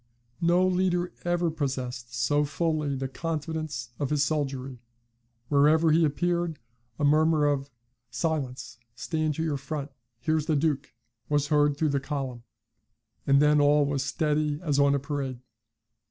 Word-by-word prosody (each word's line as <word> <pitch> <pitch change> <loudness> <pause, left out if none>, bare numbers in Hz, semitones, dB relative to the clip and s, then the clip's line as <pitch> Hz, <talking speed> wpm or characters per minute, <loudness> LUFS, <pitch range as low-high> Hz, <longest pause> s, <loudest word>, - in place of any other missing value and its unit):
No 175 +2 +4
leader 180 -1 +1
ever 175 -1 +1
possessed 130 -5 -4
so 145 +5 +2
fully 150 -1 -1
the 135 0 -3
confidence 155 -3 -4
of 140 - -1
his 150 -1 +2
soldiery: 135 -4 -2 0.7
wherever 155 +3 +4
he 165 +2 +4
appeared, 170 +2 0 0.4
a 150 - -3
murmur 155 +1 +4
of 140 -1 0 0.4
'Silence 130 -3 -3 0.2
stand 150 +6 -1
to 160 - -2
your 155 -3 -1
front 140 +1 -5 0.3
here's 155 +1 0
the 155 - +2
Duke,' 145 -1 -1 0.3
was 145 -1 +1
heard 145 -1 +3
through 155 0 +1
the 140 -1 +1
column, 135 -4 -4 0.9
and 140 0 +5
then 150 0 +4
all 145 0 +4
was 140 -2 -1
steady 150 +1 0
as 145 -4 +1
on 140 0 +4
a - - +1
parade. 140 -3 -4
145 Hz, 145 wpm, -27 LUFS, 140-160 Hz, 0.9 s, and